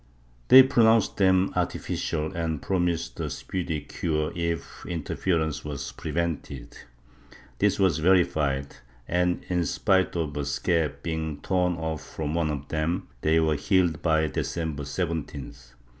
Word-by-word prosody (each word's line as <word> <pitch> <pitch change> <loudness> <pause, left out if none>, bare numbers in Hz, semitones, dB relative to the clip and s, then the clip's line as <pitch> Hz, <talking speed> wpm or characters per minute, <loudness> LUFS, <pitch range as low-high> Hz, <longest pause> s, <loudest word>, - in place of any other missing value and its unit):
They 130 +1 +10
pronounced 115 -5 +3
them 95 -1 +3
artificial 80 +2 -2
and 80 -3 -2
promised 85 -3 -1
a - - -2
speedy 80 -5 -3
cure 75 +1 -2
if 85 -1 -3
interference 80 -2 -1
was 75 -2 -5
prevented. 80 -5 -4 0.8
This 100 -1 +3
was 95 -6 +2
verified 75 -6 +2 0.3
and, 90 +1 0
in 90 -1 +1
spite 95 +3 +1
of 80 -4 -2
a 75 - -2
scab 75 +3 0
being 80 -2 -3
torn 90 -1 +1
off 80 -2 -3
from 75 -1 -4
one 85 -2 +1
of 70 -2 -4
them, 85 +5 -1
they 80 +1 +3
were 80 -1 +2
healed 85 +1 +1
by 80 -2 +2
December 80 0 -3
17th. 70 -5 -5
80 Hz, 130 wpm, -26 LUFS, 75-90 Hz, 0.8 s, They